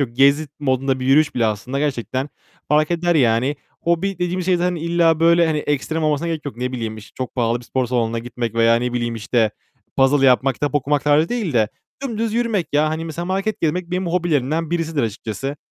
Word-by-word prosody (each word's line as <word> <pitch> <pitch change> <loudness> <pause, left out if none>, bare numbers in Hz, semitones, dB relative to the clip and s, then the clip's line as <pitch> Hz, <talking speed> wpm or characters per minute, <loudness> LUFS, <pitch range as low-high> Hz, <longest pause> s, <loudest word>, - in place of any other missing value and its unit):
yok. 135 -4 0
Gezi 140 +3 +4
mod'unda 135 -1 0
bir 130 - -3
yürüyüş 145 +3 +4
bile 120 -2 +2
aslında 115 +6 -2
gerçekten 135 -1 -2 0.4
fark 150 +1 +3
eder 175 0 +1
yani. 130 +1 +2 0.3
Hobi 170 +4 0
dediğimiz 180 0 -2
şey 185 -1 +3
zaten 180 +1 0
illa 165 -1 +2
böyle 170 +1 +5
hani 155 -1 0
ekstrem 150 +2 -1
olmasına 150 +1 +1
gerek 160 -2 -3
yok. 140 -5 -6
Ne 125 +1 -3
bileyim 115 -3 -4 0.2
çok 130 -1 -5
pahalı 120 -1 +1
bir - - -14
spor 130 +1 -1
salonuna 115 -1 0
gitmek 120 -1 -4
veya 115 0 +4
ne 125 +1 -1
bileyim 120 -1 -1
işte 110 0 +1 0.5
puzzle 135 +1 +4
yapmak, 130 +1 +4
kitap 145 +4 -2
okumak 145 0 +1
tarzı 150 +2 +3
değil 225 -9 -2
de 110 -4 +2 0.3
dümdüz 230 -4 -2
yürümek 230 -7 0
ya. 150 +1 +3
Hani 160 +1 -3
mesela 165 +1 -5
market 195 +3 -2
gezmek 170 +2 -1
benim 180 0 -1
hobilerimden 165 -2 0
birisidir 165 -4 -1
açıkçası. 115 +5 -4
145 Hz, 200 wpm, -20 LUFS, 125-170 Hz, 0.5 s, böyle